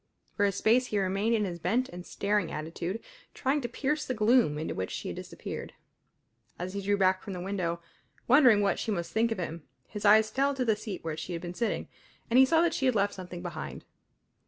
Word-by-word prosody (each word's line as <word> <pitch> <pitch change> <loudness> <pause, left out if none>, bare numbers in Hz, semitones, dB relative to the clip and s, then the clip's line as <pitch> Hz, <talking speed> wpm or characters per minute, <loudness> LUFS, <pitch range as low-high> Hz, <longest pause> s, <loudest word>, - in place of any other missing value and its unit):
For 205 - +2
a - - +1
space 230 +6 +3
he 210 - -1
remained 200 +4 +1
in 210 -2 +1
his 175 -3 -5
bent 250 +9 +1
and 175 0 -8
staring 200 -2 -1
attitude, 170 +7 -4 0.3
trying 280 +2 0
to 240 - -3
pierce 290 +5 -1
the 255 - -3
gloom 220 - +3
into 155 - -3
which 95 0 -3
she - - -5
had - - -5
disappeared. - - -7 0.8
As 180 +2 -5
he 200 - -3
drew 205 +1 +1
back 185 -1 +3
from 200 - -6
the 180 - -5
window, 175 -3 -2 0.5
wondering 250 -5 +6
what 200 -1 +1
she - - -3
must 175 -5 -2
think 225 +1 +1
of 225 - -1
him, 170 -2 -4 0.3
his 210 -1 -7
eyes 215 +1 +6
fell 275 +3 +1
to 255 -2 -1
the 220 -2 +3
seat 210 -2 -7
where 160 -1 -3
she 160 +3 -5
had 170 - -4
been 175 0 -5
sitting, 230 +5 -2 0.4
and 245 - +6
he 265 - +9
saw 325 +5 +4
that 340 -1 +2
she 265 - +1
had 255 - +2
left 205 0 +2
something 180 -1 -8
behind. 70 - -6
205 Hz, 230 wpm, -29 LUFS, 180-235 Hz, 0.8 s, he